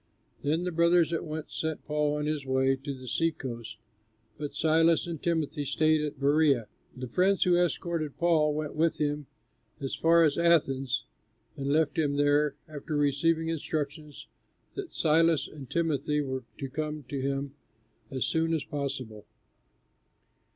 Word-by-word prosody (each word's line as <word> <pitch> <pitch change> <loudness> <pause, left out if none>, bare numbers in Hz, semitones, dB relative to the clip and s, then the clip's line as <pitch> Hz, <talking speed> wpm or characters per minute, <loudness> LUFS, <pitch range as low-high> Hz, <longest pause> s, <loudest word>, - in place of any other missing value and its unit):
Then 155 +4 0
the 180 - -2
brothers 170 0 +3
at 165 - -1
once 155 0 -6
sent 160 -1 -3
Paul 150 -1 0
on 150 - -2
his 150 -2 -1
way 130 0 +2
to 135 0 -6
the 130 0 -11
sea 165 +7 +1
coast, 115 -6 -7 0.6
but 145 +2 -6
Silas 165 +1 +3
and 170 -3 -5
Timothy 160 -3 -1
stayed 155 +2 +2
at 150 -2 -4
Berœa. 140 -4 +3 0.3
The 130 0 -5
friends 185 +10 +2
who 180 -1 +4
escorted 170 -3 -1
Paul 155 -3 +3
went 150 -1 -3
with 165 +1 +2
him 145 -1 -1 0.5
as 135 -1 -4
far 165 +1 +4
as 155 +1 +2
Athens, 135 -7 +2 0.5
and 140 -2 -4
left 155 +1 +2
him 145 -2 +1
there, 145 0 +2
after 150 0 -4
receiving 160 +3 +2
instructions 150 -1 -4 0.5
that 400 -3 -6
Silas 160 -2 +3
and 140 -4 -11
Timothy 150 -3 0
were 130 -3 -3
to 135 - -4
come 150 +2 -4
to 140 -2 -3
him 140 0 -2 0.6
as 130 -2 -1
soon 165 0 +1
as 155 - -2
possible. 135 -7 -5
150 Hz, 155 wpm, -29 LUFS, 140-160 Hz, 0.6 s, who